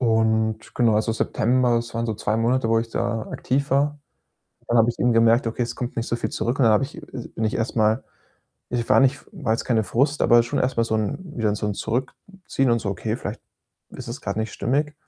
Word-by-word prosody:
und 110 Hz, -2 st, +1 dB
genau, 115 Hz, -3 st, +3 dB
also, 110 Hz, +1 st, +1 dB
September, 120 Hz, +2 st, +1 dB
das 115 Hz, 0 st, -4 dB
waren 115 Hz, 0 st, -1 dB
so 110 Hz, -, -2 dB
2 105 Hz, +1 st, -1 dB
Monate, 115 Hz, +1 st, +1 dB
wo 115 Hz, 0 st, +3 dB
ich 115 Hz, 0 st, -3 dB
da 115 Hz, -2 st, -1 dB
aktiv 140 Hz, +2 st, -1 dB
war. 145 Hz, +2 st, +2 dB, 0.7 s
Dann 120 Hz, -, +2 dB
habe 115 Hz, +1 st, +5 dB
ich 120 Hz, -, -2 dB
eben 120 Hz, -1 st, +3 dB
gemerkt: 115 Hz, +2 st, +4 dB
„Okay, 115 Hz, +2 st, -1 dB
es 120 Hz, -, -3 dB
kommt 125 Hz, 0 st, -5 dB
nicht 115 Hz, 0 st, -2 dB
so 120 Hz, -, -1 dB
viel -, -, -3 dB
zurück.“, 120 Hz, +4 st, -2 dB
und 135 Hz, -, +4 dB
dann 110 Hz, -, +5 dB
habe 105 Hz, -, +3 dB
ich 140 Hz, -, -9 dB, 0.2 s
es 120 Hz, -, -6 dB
bin 110 Hz, -, -2 dB
ich 110 Hz, -, 0 dB
erst 115 Hz, +1 st, -2 dB
mal 110 Hz, +2 st, +2 dB, 0.7 s
ich 120 Hz, -1 st, -2 dB
war -, -, +6 dB
nicht 135 Hz, +1 st, +2 dB
war 150 Hz, -, -1 dB
jetzt 115 Hz, -, -3 dB
keine 115 Hz, -3 st, +2 dB
Frust, 140 Hz, +7 st, +1 dB
aber 120 Hz, 0 st, +6 dB
schon 115 Hz, -, -2 dB
erst 125 Hz, -1 st, -1 dB
mal 115 Hz, -, +4 dB
so 110 Hz, -1 st, -1 dB
'n 110 Hz, +5 st, -1 dB, 0.2 s
wieder 105 Hz, -3 st, +1 dB
so 105 Hz, -, -3 dB
'n 105 Hz, -, -1 dB
Zurückziehen 135 Hz, -, -3 dB
und 115 Hz, 0 st, +3 dB
so: 100 Hz, -, -3 dB
„Okay, 110 Hz, +2 st, -2 dB
vielleicht -, -, -6 dB, 0.5 s
ist -, -, -9 dB
es -, -, -6 dB
grad -, -, -3 dB
nicht 110 Hz, 0 st, -2 dB
stimmig.“ 145 Hz, +8 st, -1 dB
115 Hz, 245 wpm, -23 LUFS, 110-130 Hz, 0.7 s, war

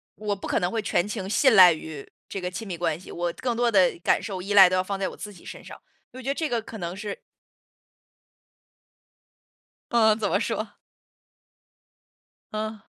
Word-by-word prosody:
我 210 Hz, -1 st, -3 dB
不 195 Hz, -, -8 dB
可 -, -, +1 dB
能 180 Hz, -, 0 dB
会 225 Hz, +1 st, -2 dB
全 205 Hz, -2 st, 0 dB
情 195 Hz, -3 st, -5 dB
信 250 Hz, +3 st, +4 dB
赖 185 Hz, -3 st, +9 dB
于 155 Hz, -2 st, -6 dB, 0.2 s
这 195 Hz, -, -6 dB
个 180 Hz, 0 st, -4 dB
亲 220 Hz, +4 st, -6 dB
密 180 Hz, -3 st, -5 dB
关 165 Hz, -1 st, -1 dB
系， -, -, -14 dB
我 175 Hz, 0 st, -2 dB
更 245 Hz, -2 st, -2 dB
多 240 Hz, 0 st, +1 dB
的 185 Hz, -5 st, +3 dB
感 -, -, +2 dB
受、 190 Hz, -4 st, -5 dB
依 200 Hz, +3 st, -3 dB
赖 195 Hz, -3 st, +9 dB
都 185 Hz, -, 0 dB
要 185 Hz, -, +1 dB
放 195 Hz, +1 st, -4 dB
在 195 Hz, -, -1 dB
我 -, -, -11 dB
自 210 Hz, -, -8 dB
己 170 Hz, -, -17 dB
身 -, -, -9 dB
上， -, -, -12 dB, 0.3 s
我 260 Hz, -, -9 dB
觉 255 Hz, -, -10 dB
得 275 Hz, -, +2 dB
这 315 Hz, 0 st, -2 dB
个 235 Hz, -2 st, -1 dB
可 220 Hz, -, -10 dB
能 175 Hz, 0 st, -4 dB
是 205 Hz, -, -6 dB, 2.7 s
嗯， 220 Hz, -2 st, +4 dB
怎 210 Hz, -3 st, -1 dB
么 -, -, +1 dB
说？ 215 Hz, -1 st, -3 dB, 1.8 s
嗯。 215 Hz, 0 st, -4 dB
200 Hz, 215 characters per minute, -25 LUFS, 180-220 Hz, 2.7 s, 赖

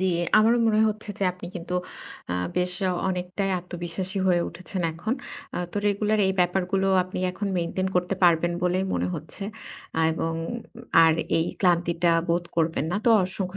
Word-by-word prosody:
জি, 190 Hz, -, +2 dB, 0.3 s
আমারও 230 Hz, +3 st, +4 dB
মনে 215 Hz, 0 st, +3 dB
হচ্ছে 215 Hz, 0 st, -5 dB
যে -, -, -3 dB
আপনি 180 Hz, -1 st, -9 dB
কিন্তু 180 Hz, +1 st, -5 dB, 0.6 s
আ -, -, 0 dB, 0.2 s
বেশ 180 Hz, 0 st, +1 dB, 0.4 s
অনেকটাই 185 Hz, +2 st, -2 dB
আত্মবিশ্বাসী 180 Hz, +2 st, -4 dB
হয়ে 175 Hz, -1 st, +4 dB
উঠেছেন 180 Hz, +2 st, -6 dB
এখন। 190 Hz, +9 st, -2 dB, 0.4 s
আ -, -, -1 dB
তো -, -, -6 dB
রেগুলার 210 Hz, +1 st, +1 dB
এই 190 Hz, -, +2 dB
ব্যাপারগুলো 190 Hz, +2 st, +1 dB, 0.2 s
আপনি 185 Hz, 0 st, -6 dB
এখন 200 Hz, +3 st, -4 dB
মেইনটেইন 185 Hz, +3 st, -1 dB
করতে 180 Hz, +2 st, +1 dB
পারবেন 170 Hz, 0 st, +4 dB
বলেই 180 Hz, +1 st, +1 dB
মনে 90 Hz, +1 st, 0 dB
হচ্ছে। 160 Hz, +5 st, -8 dB, 0.7 s
এবং 165 Hz, 0 st, -2 dB, 0.7 s
আর 160 Hz, -, +6 dB, 0.3 s
এই 165 Hz, -, +2 dB, 0.2 s
ক্লান্তিটা 175 Hz, -1 st, +2 dB, 0.2 s
বোধ 170 Hz, +1 st, +1 dB
করবেন 160 Hz, -2 st, +1 dB
না। 190 Hz, -, 0 dB
তো -, -, +4 dB, 0.2 s
অসংখ্য 185 Hz, 0 st, -4 dB
180 Hz, 160 wpm, -25 LUFS, 170-195 Hz, 0.7 s, আর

